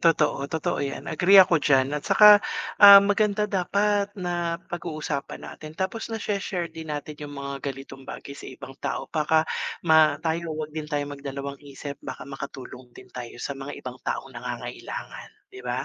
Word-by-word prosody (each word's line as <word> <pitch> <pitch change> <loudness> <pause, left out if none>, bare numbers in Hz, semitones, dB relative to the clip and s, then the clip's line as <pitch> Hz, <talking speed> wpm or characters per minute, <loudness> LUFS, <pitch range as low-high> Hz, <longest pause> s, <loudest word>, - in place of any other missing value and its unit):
Totoo, 150 -4 +2
totoo 160 -1 -2
'yan, 140 -1 -4
agree 185 +5 +5
ako 180 -4 +7
d'yan 135 -1 +3
at 150 - -1
tsaka, 210 - +7 0.5
ah, 200 -1 +12
maganda 210 +1 +2
dapat 200 +1 +1
napag-uusapan 170 -4 -4
natin 155 0 -10
tapos 190 +6 -3
nashe-share 195 -6 -3
din 160 -1 -9
natin 150 0 -6
yung 145 -1 -8
mga 140 -1 -5
ganitong 135 0 -9
bagay 140 - -8
sa - - -10
ibang 130 +1 -10
tao. - - -3
Baka 155 0 +2 0.4
ma 160 -1 +5
tayo, 160 -1 -2
'wag 155 -1 -5
din 155 -1 -5
tayong 145 -1 -2
magdalawang-isip 140 +1 -7
baka - - -7
makatulong 135 -2 -9
din 125 - -15
tayo 120 -1 -8
sa 140 - -4
mga 135 0 -7
ibang - - -8
taong - - -4
nangangailangan, - - -7 0.2
'di 390 - -10
ba? - - -2
155 Hz, 160 wpm, -25 LUFS, 140-180 Hz, 0.5 s, ah